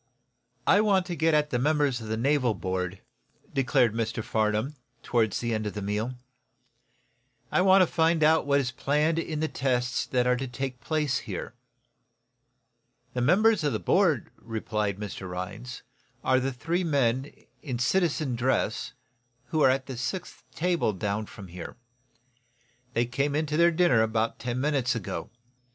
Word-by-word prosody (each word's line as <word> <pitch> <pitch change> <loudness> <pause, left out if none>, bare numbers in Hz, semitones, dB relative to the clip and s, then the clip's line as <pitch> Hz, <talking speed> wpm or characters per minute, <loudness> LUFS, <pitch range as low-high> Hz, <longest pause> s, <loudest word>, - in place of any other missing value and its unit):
"I 200 - +5
want 195 -4 +3
to 175 -1 -4
get 160 -1 +2
at 150 0 +1
the 125 - +1
members 145 -3 +1
of 110 - -7
the 110 +1 -2
naval 130 -2 +2
board," 90 0 -3 0.5
declared 130 -3 +2
Mr. 115 0 -2
Farnum, 110 +4 0 0.3
toward 115 -3 +1
the 120 -1 -1
end 110 -1 -1
of 105 - -5
the 105 - -3
meal. 105 +5 -2 1.4
"I - - +3
want 190 0 +6
to - - +4
find 165 -1 +2
out 160 -1 +4
what 140 0 +4
is 125 -3 -1
planned 150 +5 +1
in 155 -2 -3
the 160 - +1
tests 125 -3 -1
that 125 -1 +1
are 125 0 +3
to 135 +1 -3
take 130 0 -5
place 150 -6 0
here." - - -6 1.6
"The 125 - -1
members 200 - +4
of 145 - +1
the - - -1
board," - - +2
replied 105 -3 -3
Mr. 100 -2 -6
Rhinds, 95 +8 -6 0.4
"are 130 0 +3
the 135 +1 -1
three 165 +8 -1
men, 135 -4 +1 0.3
in 130 -5 -4
citizen 150 0 +1
dress, 125 +3 0 0.6
who 155 - 0
are 135 - +6
at 130 0 +1
the 130 -3 -7
sixth 175 +9 -4
table 170 -9 +1
down 105 +2 -2
from 100 - -11
here. 85 0 -8 1.2
They 120 +1 +3
came 140 +4 -1
into 150 0 0
their 170 +2 +5
dinner 165 -9 +3
about 110 0 0
ten 125 +1 -3
minutes 135 -3 +1
ago. 90 -6 -4
130 Hz, 165 wpm, -27 LUFS, 115-155 Hz, 1.6 s, want